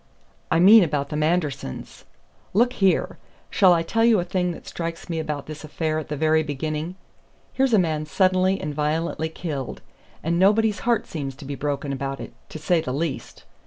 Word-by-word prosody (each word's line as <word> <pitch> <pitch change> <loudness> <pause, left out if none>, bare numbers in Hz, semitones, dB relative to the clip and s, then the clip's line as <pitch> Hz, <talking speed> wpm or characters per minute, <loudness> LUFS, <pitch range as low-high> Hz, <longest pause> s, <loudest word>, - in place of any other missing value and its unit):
"I 165 - +2
mean 205 +4 +8
about 145 -3 -1
the 150 - -4
Mandersons. 150 - -2 0.5
Look 240 +4 +3
here! 195 -6 +1 0.3
shall 190 -3 +5
I 170 -1 +3
tell 225 +7 0
you 230 -3 +5
a - - 0
thing 180 0 -1
that - - -12
strikes 165 +1 -5
me 165 - -1
about 150 -3 -4
this 155 +1 -8
affair 155 0 -2
at 155 - -7
the 150 - -4
very 155 +1 +3
beginning? 155 +3 -4 0.6
Here's 265 -3 +2
a - - +5
man 155 -4 0
suddenly 185 +4 +2
and 150 - -4
violently 160 +2 -1
killed; 150 -5 -5 0.4
and 170 +2 0
nobody's 210 +2 +3
heart 235 - +2
seems 140 -4 -5
to 135 - -11
be 140 - -5
broken 140 0 -3
about 135 0 -4
it, - - -8 0.2
to - - -7
say 160 +2 +1
the 150 - -4
least. 140 -4 -4
160 Hz, 190 wpm, -23 LUFS, 150-185 Hz, 0.6 s, mean